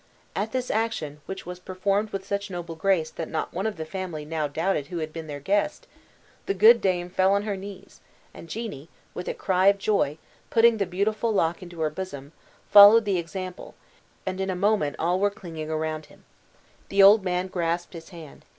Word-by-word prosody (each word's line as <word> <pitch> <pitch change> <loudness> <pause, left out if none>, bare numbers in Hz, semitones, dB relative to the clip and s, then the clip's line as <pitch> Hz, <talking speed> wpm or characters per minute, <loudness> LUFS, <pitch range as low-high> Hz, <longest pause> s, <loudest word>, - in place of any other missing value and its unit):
At 215 +2 -2
this 255 -1 -2
action 165 -10 -2
which 190 0 -6
was 180 +1 -7
performed 195 +3 -1
with 195 -2 -5
such 200 +1 -3
noble 175 -2 -6
grace 165 -1 +1
that 165 - -6
not 160 - -3
one 190 +5 -1
of 220 - -4
the 160 - -4
family 165 -3 -5
now 155 -1 -2
doubted 160 0 -1
who 175 - -6
had 155 -1 -4
been 165 -1 -7
their 145 -1 -6
guest 205 - -1 0.6
the 195 - 0
good 225 +4 +7
dame 180 -3 0
fell 185 +2 +2
on 200 0 +1
her 205 -1 -2
knees, 195 0 -10 0.3
and 165 - -12
Jeannie, 165 - -6 0.2
with 180 - -6
a - - -2
cry 185 0 +1
of 200 0 +6
joy, 195 -7 0 0.3
putting 230 -1 +5
the 200 -3 -1
beautiful 210 +5 0
lock 170 -3 +1
into 175 -2 -9
her 155 -1 +1
bosom, 150 -5 -7 0.4
followed 210 +2 +9
the 195 -3 +1
example, 185 +2 -7 0.5
and 190 0 -3
in 190 - -2
a 185 - -1
woman 200 -6 +1
all 175 +3 +1
were 205 +1 +3
clinging 165 -6 -8
around 155 0 -3
him. - - -20 0.7
The 195 0 +5
old 205 +1 +8
man 180 0 -1
grasped 175 -1 -2
his 165 -1 -10
hand. 165 -5 -12
185 Hz, 200 wpm, -25 LUFS, 165-200 Hz, 0.7 s, followed